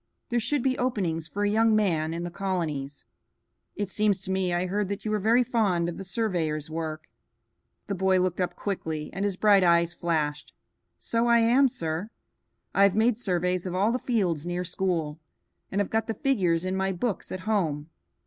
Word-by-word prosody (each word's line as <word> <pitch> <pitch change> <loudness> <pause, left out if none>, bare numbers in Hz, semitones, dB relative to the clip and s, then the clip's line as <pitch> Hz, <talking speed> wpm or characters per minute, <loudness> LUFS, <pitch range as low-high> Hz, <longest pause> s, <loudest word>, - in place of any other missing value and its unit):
There 240 - +1
should 270 +3 0
be 260 -1 +1
openings 180 -10 -1
for 205 +5 -3
a 205 - +2
young 220 0 +4
man 165 -7 +1
in 170 +1 -3
the 175 - -5
colonies. 160 -8 -3 0.7
It 205 -2 -3
seems 210 0 +1
to 190 - -4
me 190 -1 0
I 175 +1 0
heard 200 +2 -1
that 200 +2 -5
you 215 - -1
were 215 - +1
very 230 +5 +4
fond 205 -9 +1
of 170 - -4
the - - -5
surveyor's 170 -7 -2
work." 160 -1 -4 0.8
The 200 - -3
boy 190 0 +2
looked 185 0 0
up 180 - -1
quickly, 160 -6 -4
and 195 - -3
his 200 -2 -1
bright 200 -2 +5
eyes 170 -1 +3
flashed. 155 -4 -2 0.4
"So 230 +1 0
I 235 0 +5
am, 240 +4 +5
sir. 165 0 -3 0.6
I 195 - +2
have 200 -1 +5
made 225 +1 +2
surveys 180 -3 0
of 180 - -4
all 200 +4 +2
the 250 - -1
fields 185 - 0
near 175 +1 -2
school, 170 -4 -2 0.5
and 195 - -1
have 205 - -1
got 225 0 0
the 225 - -2
figures 185 - +1
in 185 0 -1
my 190 0 0
books 200 +3 -3
at 185 - -4
home. 165 -8 -1
190 Hz, 195 wpm, -27 LUFS, 170-215 Hz, 0.8 s, bright